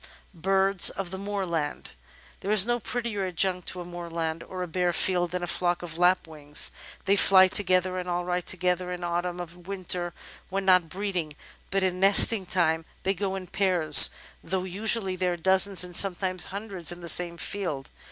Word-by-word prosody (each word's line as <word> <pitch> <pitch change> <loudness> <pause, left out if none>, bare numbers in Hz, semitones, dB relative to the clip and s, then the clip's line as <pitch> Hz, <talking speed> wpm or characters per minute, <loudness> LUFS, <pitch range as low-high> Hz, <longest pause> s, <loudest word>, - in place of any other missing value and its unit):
Birds 195 +2 +2
of 190 -3 -6
the 190 - -5
Moorland 190 -7 -4 0.5
There 195 - -6
is 210 -2 +5
no 240 0 -1
prettier 225 -4 -3
adjunct 180 0 -1
to 180 - -5
a - - -8
moorland, 170 -2 -5
or 185 +1 -7
a - - -5
bare 175 +1 -1
field, 175 0 +1
than 180 +1 -4
a - - -1
flock 175 0 -1
of 165 -1 -7
Lapwings. 160 -5 0 0.3
They 195 - +3
fly 190 -1 +6
together 185 -1 +1
and 180 0 -6
alight 180 0 -3
together 180 0 -2
in 180 0 -6
Autumn 175 +1 -3
and 175 0 -10
Winter 180 -2 -3 0.3
when 195 0 -3
not 185 -3 +3
breeding, 185 -5 -4 0.4
but 195 0 -1
in 185 -1 -1
nesting 195 +1 +6
time 165 -3 0 0.2
they 195 - 0
go 195 0 -3
in 190 -1 -6
pairs, 175 -5 +5 0.3
though 185 +2 -3
usually 195 +1 0
there 180 -1 -1
are - - -6
dozens 190 +2 +3
and 180 -1 -8
sometimes 185 -1 +2
hundreds 195 -5 -4
in 175 0 -9
the 170 - -8
same 170 0 0
field. 165 -7 -5
180 Hz, 180 wpm, -26 LUFS, 175-195 Hz, 0.5 s, fly